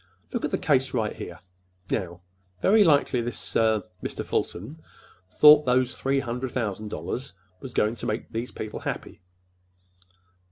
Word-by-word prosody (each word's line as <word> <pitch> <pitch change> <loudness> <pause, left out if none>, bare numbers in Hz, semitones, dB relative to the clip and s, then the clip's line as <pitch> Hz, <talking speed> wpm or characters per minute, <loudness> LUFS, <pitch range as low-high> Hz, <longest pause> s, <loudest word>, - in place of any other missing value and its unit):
Look - - -2
at - - 0
the - - 0
case 130 -2 +1
right 110 -3 -1
here. 85 -1 -8 0.5
Now, 90 -4 -2 0.4
very 210 - +5
likely 145 -7 +3
this—er—Mr. 110 -4 -1
Fulton 125 - -3 0.5
thought 150 -1 +8
those 125 0 +2
three 135 +1 0
hundred 125 0 -3
thousand 110 -3 -2
dollars 105 - -5 0.3
were 135 - -7
going 110 -2 +1
to - - -4
make 110 +2 -3
these 115 +2 -3
people 110 -1 -6
happy. - - -5
120 Hz, 135 wpm, -26 LUFS, 105-135 Hz, 0.5 s, thought